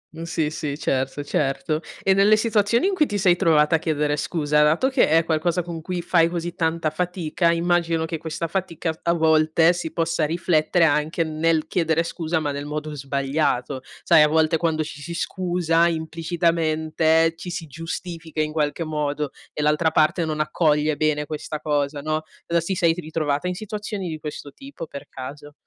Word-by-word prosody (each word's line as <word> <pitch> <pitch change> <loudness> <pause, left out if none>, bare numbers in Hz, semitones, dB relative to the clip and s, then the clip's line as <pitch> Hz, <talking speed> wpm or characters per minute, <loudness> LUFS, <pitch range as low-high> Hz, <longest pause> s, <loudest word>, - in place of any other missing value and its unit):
Mh, 165 - -8
sì, 160 -2 -1
sì, 150 -2 -4
certo, 135 0 -1
certo. 150 +2 -1 0.2
E 195 - +4
nelle 200 +2 +5
situazioni 225 - +2
in 400 - +1
cui 310 -5 +2
ti 205 - -2
sei 185 -3 +4
trovata 165 -3 +3
a - - +1
chiedere 150 -2 0
scusa 150 -1 +1
dato 155 +12 +3
che 265 -1 +3
è 165 +1 +4
qualcosa 165 +2 0
con 165 -1 -6
cui 180 +1 -3
fai 170 -2 +3
così 170 0 -4
tanta 165 -2 -1
fatica, 170 0 0
immagino 170 -1 +1
che 160 0 -4
questa 160 +1 -4
fatica 165 -2 -2
f - - -22
a 170 - +2
volte 160 0 +4
si 170 -2 -4
possa 165 -1 0
riflettere 170 +1 +2
anche 155 +2 +1
nel 160 0 0
chiedere 165 -1 +1
scusa, 165 0 -2
ma 150 -2 -2
nel 145 +1 -5
modo 150 0 -4
sbagliato. 140 -1 -1 0.2
Sai, 165 -2 +6
a 150 - +6
volte 160 +1 +2
quando 160 -1 0
ci 150 -1 -9
si 170 +3 -6
scusa, 175 -2 +1
implicitamente, 160 -1 +1
ci 170 +2 -8
si 170 -1 -4
giustifica 165 +1 -6
in 155 0 -1
qualche 155 +1 -1
modo 150 -2 -2 0.2
e - - -4
l'altra 150 +2 +3
parte 160 +2 +2
non 155 -1 -3
accoglie 155 -1 +1
bene 150 0 0
questa 155 0 -5
cosa, 145 -1 -1
no. 155 +1 -1 0.3
Uhm, 170 0 +2
si 180 +4 -2
sei 170 -3 +3
t 180 - -7
ritrovata 155 -1 -2
in 180 - -2
situazioni 210 -1 -5
di 155 - -5
questo 145 -2 -7
tipo 275 -11 -9
per 140 -2 -10
caso? 145 +3 -9
160 Hz, 185 wpm, -23 LUFS, 150-170 Hz, 0.3 s, Sai